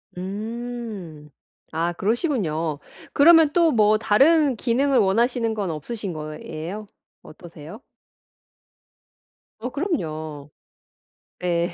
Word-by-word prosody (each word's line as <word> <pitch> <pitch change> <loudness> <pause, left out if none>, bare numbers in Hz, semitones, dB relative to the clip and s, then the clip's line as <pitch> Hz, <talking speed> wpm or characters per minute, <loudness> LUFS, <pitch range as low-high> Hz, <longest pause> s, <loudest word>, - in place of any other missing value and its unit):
음. 205 -5 -6 0.4
아 165 +2 -1
그러시군요. 180 - -1 0.3
그러면 320 0 +6
또 335 -2 +4
뭐 215 -2 +4
다른 275 +6 +4
기능을 255 +3 +2
원하시는 230 +3 +2
건 200 -5 -2
없으신 185 +5 -5
거예요? 155 +6 -7 0.3
어떠세요? 165 +3 -12 1.8
어 250 +3 -4
그럼요. 155 - -4 0.9
네. 175 -1 0
210 Hz, 190 characters per minute, -23 LUFS, 165-245 Hz, 1.8 s, 그러면